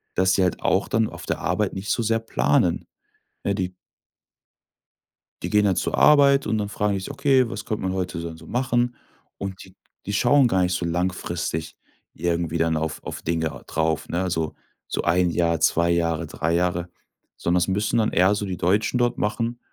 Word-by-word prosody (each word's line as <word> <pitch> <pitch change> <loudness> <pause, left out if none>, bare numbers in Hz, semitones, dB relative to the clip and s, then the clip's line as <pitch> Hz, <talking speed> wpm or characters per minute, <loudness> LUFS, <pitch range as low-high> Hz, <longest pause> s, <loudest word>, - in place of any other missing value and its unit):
dass 95 0 +3
sie 95 - +3
halt 90 - 0
auch - - +1
dann 110 0 +2
auf - - -10
der - - -2
Arbeit - - -1
nicht 95 +2 -4
so 120 - +1
sehr 115 +1 +1
planen. 115 - +1 0.6
Ne, 100 - +1
die 95 -1 -3 1.7
die - - -2
gehen 105 0 +3
dann 95 -2 +2
zur - - -1
Arbeit 140 -3 +5
und 110 +1 +1
dann 105 -1 -2
fragen 105 0 0
die 100 - -1
sich: 95 - -6
„Okay, 135 -3 +3
was - - -6
könnt 110 - -3
man 95 0 -1
heute 90 -3 -3
denn 85 -1 -6
so 80 - -14
machen?“ 120 -1 0 0.4
Und 95 -1 -6
die 95 - -17 0.3
die 100 - -3
schauen 125 +5 +4
gar 95 -5 +2
nicht 90 0 0
so 90 -1 -1
langfristig 85 -2 -2 0.4
irgendwie 85 -1 -1
dann 80 -1 +1
auf 80 0 -3
auf - - -6
Dinge 80 -5 -2
drauf, 80 0 -1
ne, 85 - -1
also, 80 -4 -2 0.3
so - - -2
1 90 +1 +3
Jahr, 85 -1 +1
2 85 +1 +3
Jahre, 85 -2 0
3 85 +2 -2
Jahre, 90 0 0 0.5
sondern 90 +1 +1
es 85 - 0
müssen 105 +4 0
dann 110 - +1
eher 95 +3 +4
so 105 - -3
die 95 -2 -4
Deutschen 105 +7 +1
dort 120 0 +1
machen 115 +3 -1
95 Hz, 200 wpm, -24 LUFS, 85-110 Hz, 1.7 s, Arbeit